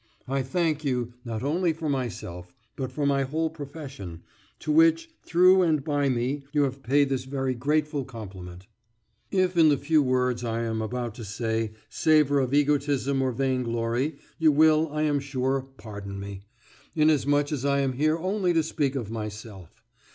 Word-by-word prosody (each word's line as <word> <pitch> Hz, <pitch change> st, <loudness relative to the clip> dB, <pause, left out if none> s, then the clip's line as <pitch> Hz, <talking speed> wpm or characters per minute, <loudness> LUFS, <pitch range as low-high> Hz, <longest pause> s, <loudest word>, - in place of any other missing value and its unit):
I 135 Hz, +1 st, 0 dB
thank 155 Hz, +3 st, -1 dB
you, 125 Hz, -4 st, -1 dB
not 115 Hz, -2 st, -4 dB
only 165 Hz, +4 st, +1 dB
for 160 Hz, 0 st, -5 dB
myself, 120 Hz, -8 st, -4 dB, 0.2 s
but 130 Hz, -2 st, -4 dB
for 145 Hz, +3 st, -2 dB
my 140 Hz, -1 st, +2 dB
whole 155 Hz, +4 st, -1 dB
profession, 135 Hz, -, -8 dB, 0.3 s
to -, -, -3 dB
which, 330 Hz, +1 st, +4 dB
through 185 Hz, +2 st, +5 dB
and 155 Hz, -5 st, +2 dB
by 145 Hz, -2 st, +1 dB
me, 130 Hz, +3 st, -1 dB
you 145 Hz, -1 st, +3 dB
have 135 Hz, 0 st, -2 dB
paid 140 Hz, +2 st, +2 dB
this 130 Hz, -1 st, -2 dB
very 135 Hz, -1 st, -2 dB
grateful 150 Hz, +3 st, 0 dB
compliment. 95 Hz, -7 st, -9 dB, 0.6 s
If 185 Hz, -2 st, +1 dB
the 155 Hz, -4 st, +5 dB
few 155 Hz, +2 st, +3 dB
words 125 Hz, -2 st, +1 dB
I 115 Hz, 0 st, -1 dB
am 110 Hz, -1 st, -2 dB
about 120 Hz, +1 st, -3 dB
to 115 Hz, -, -7 dB
say 110 Hz, +1 st, -2 dB
savour 150 Hz, -3 st, +3 dB
of 130 Hz, -2 st, 0 dB
egotism 140 Hz, -2 st, +1 dB
or 130 Hz, -1 st, +1 dB
vainglory, 125 Hz, +2 st, -1 dB, 0.2 s
you 160 Hz, -1 st, +5 dB
will, 155 Hz, +1 st, +4 dB
I 150 Hz, +1 st, -1 dB
am 145 Hz, -2 st, +2 dB
sure, 135 Hz, -1 st, -1 dB, 0.2 s
pardon 100 Hz, -2 st, -7 dB
me, 100 Hz, -1 st, -7 dB, 0.5 s
inasmuch 145 Hz, -2 st, +3 dB
as 140 Hz, -4 st, -2 dB
I 140 Hz, 0 st, +2 dB
am 135 Hz, -1 st, 0 dB
here 155 Hz, +5 st, +1 dB
only 185 Hz, +1 st, 0 dB
to 165 Hz, -1 st, +3 dB
speak 145 Hz, -3 st, -1 dB
of 115 Hz, -5 st, -4 dB
myself. 105 Hz, -5 st, -8 dB
135 Hz, 165 wpm, -26 LUFS, 120-155 Hz, 0.6 s, through